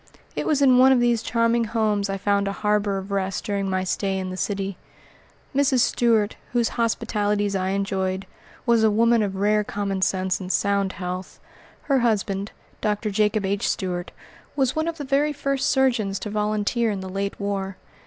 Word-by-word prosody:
It - - -2
was 290 -2 +2
in 255 -2 +6
one 260 +1 +7
of 260 - +5
these 240 -2 +2
charming 230 0 +1
homes 215 -3 0
I 195 - -1
found 200 0 +1
a - - 0
harbor 210 -1 0
of 195 +1 -6
rest 195 -1 -1
during 200 -2 -2
my 185 0 0
stay 190 +1 -1
in 185 -1 -3
the - - -5
city. 195 0 -2 0.8
Mrs. 270 -2 +3
Stuart, 225 -3 +2 0.2
whose 235 -2 +2
hospitalities 205 -3 0
I 185 -1 0
enjoyed, 190 -1 -1 0.4
was 235 -2 +4
a 220 - +5
woman 230 +2 +3
of 200 -2 -1
rare 210 +2 +2
common 200 -2 -3
sense 185 -1 +1
and 185 -1 -4
sound 200 -1 +1
health. 180 0 -6 0.4
Her 275 -2 +2
husband, 205 -4 0 0.3
Dr. 210 0 -1
Jacob 210 0 +1
H. 200 +1 0
Stuart, 180 -2 -2 0.5
was 265 -3 +1
one 315 +1 0
of 335 -1 -3
the 290 - -5
very 285 +2 +1
first 275 -1 -1
surgeons 240 -8 +2
to 210 - -5
volunteer 215 +2 0
in 200 -2 -3
the 190 - -6
late 195 +1 -3
war. 195 -1 -3
205 Hz, 185 wpm, -24 LUFS, 195-230 Hz, 0.8 s, one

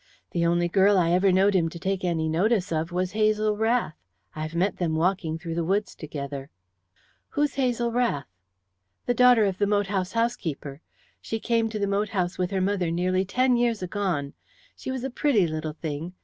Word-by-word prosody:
The 170 -1 +1
only 175 +1 +2
girl 195 +3 +4
I 170 -2 +3
ever 185 +2 +4
knowed 195 +2 +4
him 170 -4 +2
to 170 - -9
take 190 +2 -2
any 165 -3 0
notice 190 +4 +1
of 160 +1 -1
was 180 +1 -1
Hazel 215 0 +2
Rath. 225 -4 +1 0.4
I 155 - -5
have 155 +1 -5
met 185 +2 +1
them 165 -3 -1
walking 165 -1 0
through 165 0 -6
the 170 0 -1
woods 195 +4 0
together." 140 -2 -6 0.9
"Who 295 - +4
is 295 - 0
Hazel 245 -3 0
Rath?" 230 - 0 0.8
"The 245 - +2
daughter 245 -2 +6
of 190 -2 -2
the 205 - +2
moat 205 0 +2
house 185 -1 -1
housekeeper. 165 - -2 0.4
She 225 - -4
came 230 -1 +1
to 220 - -4
the 205 - 0
moat 200 +1 0
house 180 -3 -2
with 180 -1 0
her 190 -1 -1
mother 185 -2 0
nearly 185 +3 0
ten 250 +5 +2
years 235 -4 +1
agone. 180 -7 -2 0.4
She - - -7
was 260 -1 -3
a 265 - -3
pretty 245 -8 +2
little 155 -1 -3
thing. 160 +2 -5
190 Hz, 200 wpm, -26 LUFS, 165-215 Hz, 0.9 s, daughter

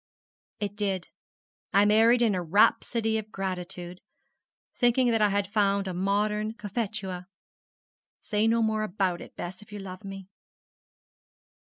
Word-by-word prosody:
'It 205 -1 -3
did. 195 -4 -2 0.6
I 200 +1 +6
married 225 +3 +5
in 220 -3 +3
a 180 - -1
rhapsody 220 +5 +2
of 215 0 -9
gratitude, 180 -2 -4 0.7
thinking 245 0 +3
that 225 -1 +2
I 210 - +5
had 200 0 -1
found 200 -2 +2
a 185 - -3
modern 210 +3 0
Cophetua. 200 -4 -4 0.9
Say 210 +1 0
no 230 0 +3
more 220 -1 +1
about 190 -3 -1
it, - - -12
Bess, 180 +3 -6
if 210 - -16
you 205 - -6
love 190 -1 -8
me!' 195 -1 -8
205 Hz, 140 wpm, -27 LUFS, 190-220 Hz, 0.9 s, I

